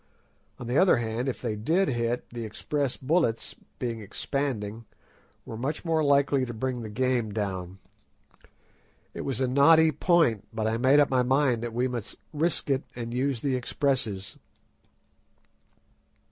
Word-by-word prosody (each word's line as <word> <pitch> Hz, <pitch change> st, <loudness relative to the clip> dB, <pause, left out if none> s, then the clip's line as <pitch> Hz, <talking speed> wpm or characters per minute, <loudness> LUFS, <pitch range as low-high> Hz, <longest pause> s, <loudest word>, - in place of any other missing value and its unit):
On 125 Hz, -, -8 dB
the 120 Hz, +4 st, +1 dB
other 185 Hz, -6 st, +5 dB
hand, 120 Hz, +3 st, -2 dB
if 130 Hz, -, -6 dB
they 105 Hz, -, -1 dB
did 165 Hz, -, +1 dB
hit, 120 Hz, -1 st, -1 dB
the 120 Hz, -1 st, -5 dB
express 135 Hz, +5 st, -2 dB
bullets, 135 Hz, -5 st, 0 dB, 0.2 s
being 115 Hz, -2 st, -3 dB
"expanding," 115 Hz, -1 st, -3 dB, 0.6 s
were -, -, -7 dB
much 135 Hz, +9 st, -3 dB
more 160 Hz, -1 st, +2 dB
likely 140 Hz, -1 st, +3 dB
to 120 Hz, -2 st, -5 dB
bring 125 Hz, +1 st, -2 dB
the 110 Hz, -, -6 dB
game 120 Hz, -1 st, 0 dB
down. 95 Hz, -3 st, -4 dB, 1.4 s
It -, -, -5 dB
was 135 Hz, -3 st, -3 dB
a 130 Hz, -, +1 dB
knotty 160 Hz, +5 st, +6 dB
point, 160 Hz, -, +2 dB
but 110 Hz, -1 st, -3 dB
I 110 Hz, +1 st, +1 dB
made 135 Hz, +4 st, +5 dB
up 145 Hz, -, +3 dB
my 130 Hz, -1 st, +3 dB
mind 130 Hz, -2 st, +2 dB
that 120 Hz, 0 st, -4 dB
we 125 Hz, +2 st, +1 dB
must 120 Hz, -4 st, -5 dB, 0.2 s
risk 160 Hz, +2 st, -1 dB
it 135 Hz, 0 st, +2 dB
and 120 Hz, -1 st, -5 dB
use 130 Hz, -1 st, -1 dB
the 135 Hz, -2 st, 0 dB
expresses. 120 Hz, -6 st, -1 dB
125 Hz, 155 wpm, -27 LUFS, 115-140 Hz, 1.4 s, knotty